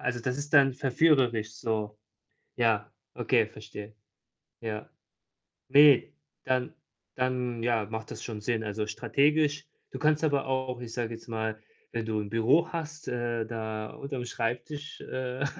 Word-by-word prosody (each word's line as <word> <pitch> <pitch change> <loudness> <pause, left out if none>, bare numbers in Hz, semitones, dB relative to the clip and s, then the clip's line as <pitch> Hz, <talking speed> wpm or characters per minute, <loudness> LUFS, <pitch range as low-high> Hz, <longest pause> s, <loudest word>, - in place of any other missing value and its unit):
Also, 120 -1 -1
das 125 +2 -2
ist 145 0 -5
dann 135 -1 +7
verführerisch 125 -5 +3
so. 105 -1 -2 0.6
Ja, 110 -3 +2 0.2
okay, 115 -4 +3
verstehe, 105 -1 -10 0.7
ja. 110 -2 -4 0.8
Ne, 140 -1 +7 0.3
dann 130 -1 0 0.4
dann, 125 -2 -1
ja, 115 -3 +2
macht 110 +1 -6
das - - -6
schon 110 -3 -5
Sinn, 115 +1 0
also, 105 0 -2
strategisch. 145 +6 +2 0.3
Du - - -6
kannst 155 0 +3
aber 140 -3 +1
auch, 130 -2 -1
ich 120 - -7
sage 115 -1 -2
jetzt 115 +1 -10
mal, 110 -1 -2 0.4
wenn 115 -1 -2
du 110 -1 -1
'n 105 -1 -4
Büro 115 +8 +4
hast, 160 -1 -5
äh, 120 -2 -1
da 110 -1 -4
unterm 140 -3 -5
Schreibtisch, 125 +6 -3
äh, 130 +1 -3
120 Hz, 145 wpm, -29 LUFS, 110-135 Hz, 0.8 s, dann